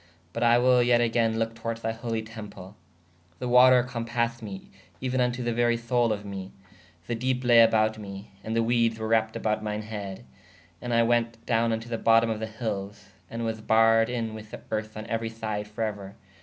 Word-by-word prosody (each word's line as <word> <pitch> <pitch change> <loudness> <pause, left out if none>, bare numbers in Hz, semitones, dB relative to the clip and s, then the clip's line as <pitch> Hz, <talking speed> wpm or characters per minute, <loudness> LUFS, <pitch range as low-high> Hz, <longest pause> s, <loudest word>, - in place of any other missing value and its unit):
But 115 - -4
I 120 0 +5
will 125 0 +4
yet 120 0 +4
agayne 115 -1 +1
loke 115 0 -1
towarde 115 0 -4
thy 115 - 0
holy 115 -1 -3
temple. 105 -3 -10 0.6
The 125 - -4
water 125 0 +6
cōpased 120 -1 -2
me 100 -3 -8 0.3
euē 130 -1 -3
vn 125 -1 +2
to 125 0 -5
the 120 0 -1
very 120 0 +2
soule 120 0 +1
of 105 -1 -3
me: 95 -1 -7 0.5
the 120 - -2
depe 125 +2 -1
laye 120 -1 +7
aboute 110 0 +1
me: 100 -1 -9
ād 110 +1 -3
the 115 - +2
wedes 115 -1 +2
were 110 0 -4
wrappte 110 0 +1
aboude 110 0 0
myne 105 0 -3
heed. 105 -1 -7 0.6
And 120 - -4
I 115 0 +4
wēt 115 0 +1
downe 115 -1 +2
vn 110 0 -1
to 115 - -11
the 115 -1 -3
botome 115 0 +4
of 110 - -3
the 110 - -3
hylles/ 105 -3 -5 0.2
and 115 0 -4
was 110 -1 -3
barredin 115 +1 +3
with 110 -1 -9 0.2
erth 110 0 -3
on 110 - -6
euery 115 0 -2
syde 110 -2 -4
for 105 +2 -4
euer. 100 -3 -5
115 Hz, 205 wpm, -27 LUFS, 110-120 Hz, 0.6 s, laye